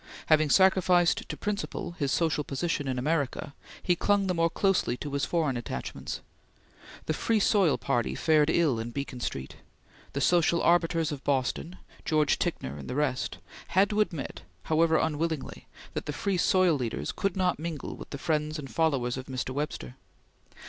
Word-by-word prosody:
Having 155 -1 +5
sacrificed 180 -1 +4
to - - -4
principle 205 -4 -3
his 145 -6 -2
social 160 -3 +1
position 145 0 -2
in 130 -1 -1
America, 140 0 -1 0.3
he 175 - +3
clung 200 +3 +2
the 185 - 0
more 165 -1 +2
closely 195 -8 +1
to 145 +1 -6
his 140 0 0
foreign 155 -6 0
attachments. 110 - -5 0.8
The 155 - 0
Free 220 +7 +1
Soil 195 -6 +3
Party 120 -4 -1
fared 155 -1 +3
ill 155 -8 +2
in 115 +1 -4
Beacon 140 0 -5
Street. 65 - -5 0.6
The 140 - -1
social 170 +1 +3
arbiters 165 -2 +3
of 140 -2 -6
Boston 145 +6 -1 0.3
George 155 -2 +2
Ticknor 70 +3 -2
and 70 - -8
the - - -3
rest 135 -3 -1 0.4
had 200 +2 +5
to 210 0 +2
admit, 165 -9 -3 0.2
however 160 0 +3
unwillingly, 160 -1 -2 0.3
that - - -4
the 150 - -2
Free 195 +4 -1
Soil 185 -1 +4
leaders 125 -5 -3
could 195 -2 -2
not 180 -3 +1
mingle 160 -3 -5
with - - -10
the 140 - -5
friends 155 +1 -1
and 135 -3 -7
followers 135 -7 +1
of 130 - -7
Mr. 130 0 -3
Webster. 130 - -4
155 Hz, 170 wpm, -28 LUFS, 135-175 Hz, 0.8 s, Having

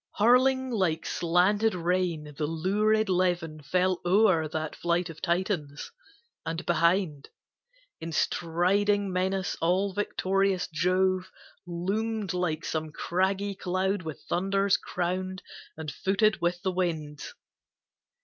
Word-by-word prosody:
Hurling 255 +4 +4
like 180 -8 0
slanted 185 +5 +2
rain, 170 -4 -1
the 150 0 -2
lurid 210 +7 +1
levin 175 -4 0
Fell 180 +5 +1
o'er 180 -3 +4
that 155 0 -4
flight 170 0 0
of 160 - -14
Titans, 170 -5 -2 0.5
and 165 +2 -4
behind, 170 -3 +1 0.7
In 165 +1 -6
striding 190 +5 +1
menace, 190 0 -1
all 185 +4 +1
victorious 195 -1 0
Jove 185 +3 +1 0.4
Loomed 200 +3 -2
like 175 -3 -1
some 155 -1 -3
craggy 190 +5 -1
cloud 190 +1 -1
with 160 -4 -7
thunders 195 +2 +2
crowned 185 +1 -3 0.3
And 155 -2 -5
footed 200 +6 +1
with 175 +1 -1
the 190 - +1
winds. 160 -5 -3
180 Hz, 110 wpm, -28 LUFS, 165-195 Hz, 0.7 s, Hurling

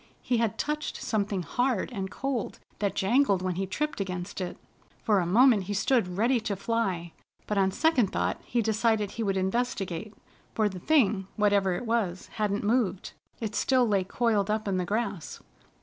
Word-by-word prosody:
He 245 - +1
had 230 -3 0
touched 300 +1 -2
something 205 -4 -1
hard 245 +2 0
and 190 -3 -3
cold 270 -3 -3 0.2
that 200 -1 -1
jangled 200 -2 +2
when 185 -1 0
he 190 +2 -2
tripped 300 +4 -2
against 180 0 -4
it. 180 - -4 0.5
For 210 -4 +3
a 175 - 0
moment 220 0 +5
he 205 +2 -3
stood 195 -3 +1
ready 240 +4 +3
to 215 -2 -3
fly, 190 -5 -2 0.3
but 210 -1 0
on 190 -1 +3
second 260 +1 +2
thought - - -1
he 235 -1 0
decided 220 -1 +1
he 230 - -5
would 195 -2 0
investigate, 200 -1 -2 0.4
for 215 -1 +3
the 190 -3 -5
thing, 215 - +2
whatever 200 -3 +3
it 245 - -4
was, 215 -6 -1
hadn't 205 -1 0
moved. 205 -4 0 0.3
It 220 -2 -3
still 255 0 +3
lay 200 -3 +2
coiled 210 0 0
up 215 0 -1
in 190 -2 0
the 180 - -1
grass. 200 -4 -3
205 Hz, 180 wpm, -28 LUFS, 190-235 Hz, 0.5 s, moment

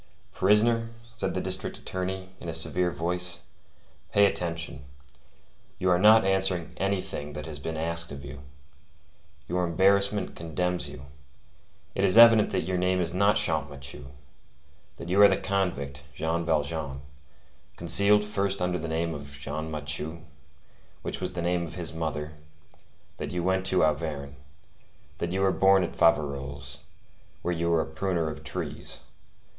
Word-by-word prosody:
"Prisoner," 115 +4 +3 0.3
said 115 - -2
the - - 0
district - - 0
attorney, 95 0 -4
in 85 - -7
a - - -3
severe 90 +2 0
voice; 90 +1 -1 0.7
"pay 100 0 +5
attention. 85 -7 -2 0.9
You 90 0 +1
are 90 - +3
not 110 +1 +7
answering 95 -3 +1
anything 95 -6 -2
that 75 +1 -6
has 75 -3 -7
been 80 +3 -5
asked 85 +1 -2
of 70 0 -8
you. 70 0 -9 1.1
Your 90 +1 -1
embarrassment 100 +3 +2
condemns 90 +2 -2
you. 65 - -10 0.9
It 95 - -1
is 100 +2 +5
evident 115 -2 +8
that 95 - -1
your 95 -1 -1
name 90 0 +1
is 85 -1 0
not 100 +3 +3
Champmathieu; 70 -4 -1 0.9
that - - -9
you 95 +3 +4
are 100 - +10
the - - +2
convict, 70 -8 -2
Jean 80 +2 -1
Valjean, 75 -3 -1 0.8
concealed 100 +5 +5
first 100 -2 -1
under 90 0 -1
the 80 - -4
name 80 +1 -1
of 70 -1 -8
Jean 75 +3 -4
Mathieu, 75 +2 -2 0.8
which - - -3
was 90 - -2
the 85 -1 -3
name 90 0 0
of 80 - -8
his 85 -3 -4
mother; 80 -1 -4 0.8
that - - -5
you 90 -1 -2
went 95 +1 +1
to 95 - +3
Auvergne; 75 -2 -1 0.8
that 85 - -2
you 95 +1 -1
were 95 -1 +3
born 95 0 +4
at 85 - -5
Faverolles, 70 -4 0 0.6
where 90 - 0
you 85 0 -1
were 85 -1 +3
a - - -3
pruner 85 -1 -2
of - - -10
trees. - - -5
85 Hz, 150 wpm, -27 LUFS, 80-95 Hz, 1.1 s, are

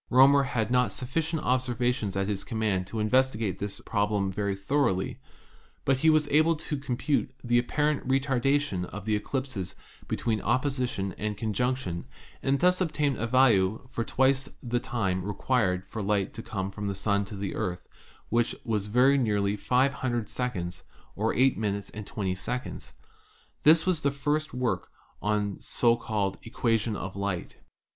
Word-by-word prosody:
Roemer 135 +2 +7
had 120 -4 -1
not 125 -4 +3
sufficient 160 +7 -2
observations 125 -4 0
at 95 0 0
his 100 -2 -2
command 105 -5 -1
to 110 - -4
investigate 110 -4 +1
this 100 -1 -4
problem 105 -2 0
very 100 0 -1
thoroly, 100 -2 0 0.7
but 135 -1 +3
he 160 +5 +4
was 155 -1 +4
able 155 +3 +4
to 155 0 -3
compute 140 +1 -1
the 120 0 +3
apparent 150 +3 0
retardation 135 -6 +1
of 100 +2 -8
the 110 -1 +2
eclipses 110 -4 -3 0.3
between 110 -2 -1
opposition 125 -8 0
and 105 -1 -2
conjunction 110 -4 -1 0.3
and 135 +1 +1
thus 180 +1 +4
to 185 - +3
obtain 150 -4 0
a 115 +1 -2
value 115 -4 +3
for 115 - -1
twice 135 +3 +2
the 120 -1 0
time 105 -8 -1
required 100 -2 0
for 110 +3 -5
light 100 -1 0
to 115 - -6
come 95 -3 -4
from 105 0 -5
the 100 - -2
Sun 100 +1 +1
to 105 - -8
the 100 0 -3
Earth, 90 -4 -3 0.4
which 120 +1 +2
time - - -13
was 105 -4 -1
very 130 +6 +4
nearly 105 -4 +1
500 125 0 +1
seconds, 90 -9 -3 0.3
or - - +1
eight 130 +2 +3
minutes 100 -2 -2
and 105 -1 -8
twenty 95 -3 -2
seconds. 125 +7 -5 0.7
This 160 +2 +6
was 185 -4 +2
the 140 - +2
first 145 +2 -1
work 125 -1 -1 0.3
on 105 -1 0
the - - -22
so 115 -1 +3
called 105 -4 -2
"equation 115 -1 0
of 95 -1 -5
light." 100 -3 -3
115 Hz, 165 wpm, -28 LUFS, 100-130 Hz, 0.7 s, Roemer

